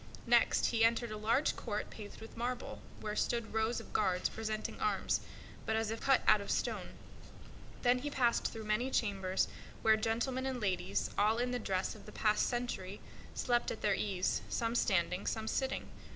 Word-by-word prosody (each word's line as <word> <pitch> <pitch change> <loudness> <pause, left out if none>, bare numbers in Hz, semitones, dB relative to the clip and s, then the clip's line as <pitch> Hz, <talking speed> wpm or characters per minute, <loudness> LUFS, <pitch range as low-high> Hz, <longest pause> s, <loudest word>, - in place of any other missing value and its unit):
Next - - +4
he 225 -2 +2
entered 230 0 +3
a - - -3
large 230 +7 +2
court 210 -3 -3
paved 210 -1 -9
with 225 - -10
marble, 245 +2 -3 0.2
where 210 -1 -3
stood 235 0 -1
rows 220 +2 +1
of - - -11
guards 185 -3 +2
presenting 215 -1 -4
arms, 430 -1 +1 0.4
but 220 - 0
as 220 -1 0
still - - 0
as 225 - -5
if - - -8
cut 270 -1 +6
out 215 -1 +7
of 200 - -7
stone; - - -1 0.9
then 245 +1 +4
he 290 +3 -3
passed 245 -4 +2
through 225 - -7
many 215 +5 +1
chambers 195 -6 +1 0.4
where 220 0 +6
gentlemen 245 +4 0
and 260 -2 -2
ladies, 195 -5 0
all 215 +2 +4
in 245 +1 0
the 250 - -1
dress 190 -4 -1
of 215 - -13
the - - -8
past 210 -1 +2
century, 240 -6 -3 0.4
slept 240 -1 +1
at - - -5
their 205 - +4
ease, 190 -2 0
some 230 0 0
standing, 185 -4 +1
some 220 0 -1
sitting. 265 +3 -1
225 Hz, 190 wpm, -34 LUFS, 210-240 Hz, 0.9 s, out